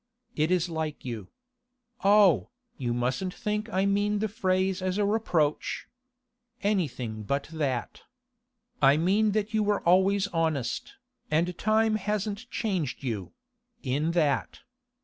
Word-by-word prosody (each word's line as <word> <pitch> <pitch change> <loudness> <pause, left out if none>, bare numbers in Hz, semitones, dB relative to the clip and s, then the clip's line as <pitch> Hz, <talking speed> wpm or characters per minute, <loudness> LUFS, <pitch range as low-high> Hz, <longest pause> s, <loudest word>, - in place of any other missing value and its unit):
It 155 +1 +1
is 180 -1 +2
like 160 -4 -4
you. 115 -6 -5 0.8
Oh, 200 -2 +5 0.3
you 120 -3 -2
mustn't 125 +10 -1
think 210 +1 -3
I 190 0 +1
mean 205 +1 +1
the 220 +1 0
phrase 190 -3 0
as 185 +1 -1
a 205 - +2
reproach. 180 -8 0 0.8
Anything 130 - -1
but 140 +8 -2
that. 135 -6 -2 0.8
I 140 +1 +6
mean 200 +6 +2
that 215 +1 -1
you 220 - +2
were 205 -1 +1
always 190 +2 +4
honest, 160 -8 -1 0.3
and 170 +4 +1
time 215 +2 +2
hasn't 210 +3 -3
changed 180 - -2
you—in 195 - -4
that. 145 -7 0
185 Hz, 125 wpm, -28 LUFS, 150-210 Hz, 0.8 s, I